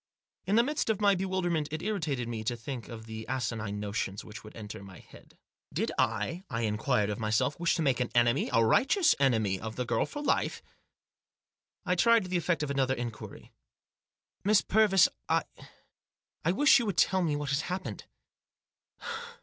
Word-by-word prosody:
In 200 - +2
the 235 - +6
midst 290 -2 -1
of 215 -2 +1
my 205 -1 +4
bewilderment 180 -5 -1
it 155 +1 -5
irritated 155 - -2
me 115 -2 -4
to 120 +2 0
think 120 +1 -7
of 110 -2 -8
the 110 0 -7
asinine 110 -5 -3
notions 100 -1 -3
which 105 +2 -10
would 110 - -12
enter 105 -3 -8
my 95 -2 -12
head. - - -17 0.3
Did - - -1
I, 175 +3 -1
I 115 -3 -2
inquired 105 0 +1
of 105 - -4
myself, 115 +7 0
wish 170 -1 +2
to 165 - -1
make 135 -4 +2
an 125 - 0
enemy, 120 +3 +3
a 115 -2 +4
righteous 300 - +4
enemy, 110 -8 +2
of 110 +1 -6
the 125 - -2
girl 115 -1 0
for 295 0 -6
life? - - 0 1.2
I 180 - +2
tried 230 +3 +4
the 185 0 -1
effect 170 -1 0
of 145 - -2
another 135 -1 +1
inquiry. 120 -3 -7 0.9
"Miss 205 +1 +4
Purvis, 200 -4 +4 0.2
I - - +3 0.5
— - - -59
I 165 - +2
wish 275 +7 +5
you 235 - -2
would 195 -5 -2
tell 190 -1 +3
me 160 -4 0
what 145 -1 -3
has 140 +2 +1
happened." 185 +2 -5
135 Hz, 180 wpm, -29 LUFS, 115-185 Hz, 1.2 s, the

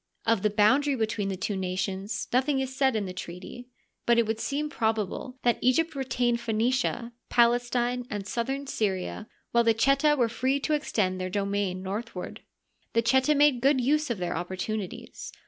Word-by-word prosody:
Of 230 -3 +2
the 210 - +2
boundary 255 +8 +3
between 220 -4 -1
the 190 - -3
two 200 +2 -2
nations 190 +2 -3
nothing 265 +2 +2
is 265 0 -3
said 265 -3 +2
in 210 -2 0
the 185 - -5
treaty; 185 +7 -8 0.4
but 235 0 +5
it 235 - +4
would 220 +1 -2
seem 290 +5 -1
probable 225 - -2
that 240 -1 +2
Egypt 320 +6 +2
retained 250 -3 0
Phoenicia, 235 +1 0 0.2
Palestine, 240 +1 +2
and 205 -2 -4
southern 270 +6 -2
Syria, 210 -4 -2 0.2
while 235 0 +4
the 230 -1 +3
Cheta 275 +5 +3
were 240 -3 +3
free 260 +4 0
to 305 - 0
extend 195 -11 0
their 185 - -2
domain 200 -1 -1
northward. 195 -1 -5 0.5
The 230 - +2
Cheta 265 +5 +3
made 285 -4 +4
good 275 +1 +4
use 295 +4 +1
of 235 - -1
their 175 -1 -2
opportunities. 185 +3 -5
235 Hz, 170 wpm, -27 LUFS, 200-265 Hz, 0.5 s, but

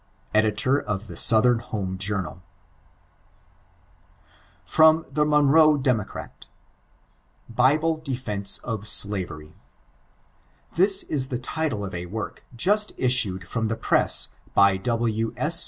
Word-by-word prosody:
Ed. 110 -1 +1
of 110 -7 -2
the - - -11
Southern 115 +1 +5
Home 95 -5 -6
Journal 100 -3 -3 2.2
[FROM 160 - +3
"THE 150 +2 0
MONROE 150 +1 +3
DEMOCRAT."] 125 -7 -4 1.1
BiBLK 155 +6 0
Defknce 105 -8 -1
or 110 -3 -3
Slavirt.— 95 -7 +3 1.2
This 190 +3 +3
is 135 -3 -2
the 125 - -4
title 130 -4 -4
of 95 - -9
a 90 0 -6
work 110 +4 -8
Just 210 - 0
issued 105 -8 +2
from 110 +1 -3
the 115 0 -4
press, - - +1 0.3
by 100 -1 +4
W. 115 +1 -3
S. 155 +6 0
115 Hz, 110 wpm, -23 LUFS, 100-150 Hz, 2.2 s, Southern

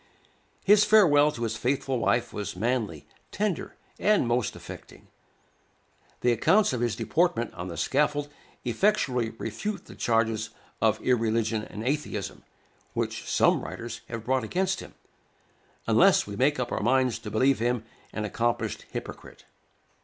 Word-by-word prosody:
His 210 +1 +6
farewell 150 -9 +5
to 120 - -5
his 110 -1 -1
faithful 130 +2 -1
wife 120 +1 +1
was 100 -3 -4
manly, 110 - -1 0.3
tender, 205 -4 -2 0.2
and 210 - +3
most 120 -2 0
affecting. - - -11 1.1
The 125 - +3
accounts 190 - +3
of 120 - -2
his 120 -3 0
deportment 155 -9 0
on 85 - -6
the 85 - -6
scaffold 145 +1 +1 0.4
effectually 125 - +1
refute 180 - -4
the - - -12
charges 115 -1 0 0.3
of 110 -1 +3
irreligion 115 -2 +1
and 105 - -7
atheism, 130 -6 -3 0.5
which - - -3
some - - +3
writers 115 -1 -7
have 115 -1 -6
brought 130 0 +1
against 185 +9 0
him, - - -11 0.9
unless - - +5
we 100 - -7
make 135 +5 +2
up 120 -1 -2
our - - -1
minds 125 0 +2
to 115 -2 -7
believe 130 +5 +2
him 120 0 0 0.3
an 110 - -3
accomplished 115 0 -2
hypocrite. - - -8
120 Hz, 140 wpm, -27 LUFS, 110-145 Hz, 1.1 s, His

